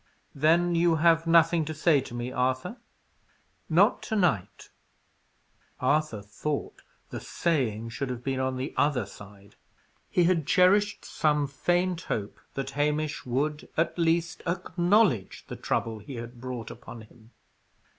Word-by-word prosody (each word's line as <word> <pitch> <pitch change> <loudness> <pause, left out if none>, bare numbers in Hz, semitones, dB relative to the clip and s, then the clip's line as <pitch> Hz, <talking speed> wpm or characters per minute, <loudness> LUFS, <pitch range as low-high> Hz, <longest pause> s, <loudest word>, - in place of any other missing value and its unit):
"Then 165 +5 +3
you 170 0 +3
have 165 0 +3
nothing 165 0 +5
to 155 +1 -5
say 155 -2 +3
to 120 - -9
me, 120 +1 -4
Arthur?" 130 - -1 0.9
"Not - - +4
to 220 - 0
night." 170 - 0 1.1
Arthur 130 -5 0
thought 140 +8 -4 0.3
the - - -4
"saying" 120 -10 -1
should 130 +3 -4
have 125 -1 -5
been 135 0 -1
on 130 0 -1
the 130 +3 -4
other 140 -6 +2
side. 100 0 -14 0.5
He 180 - +3
had 170 -4 +2
cherished 205 +3 +3
some 150 -1 +1
faint 175 +5 0
hope 105 - -4 0.2
that 135 0 -3
Hamish 150 0 -1
would 145 +5 -2
at 165 - +1
least 170 +1 +1
acknowledge 175 - +1
the - - -7
trouble 110 -1 -2
he 125 +6 -9
had 120 +1 -8
brought 125 -3 -5
upon 115 0 -10
him. 110 +1 -18
145 Hz, 140 wpm, -27 LUFS, 125-170 Hz, 1.1 s, nothing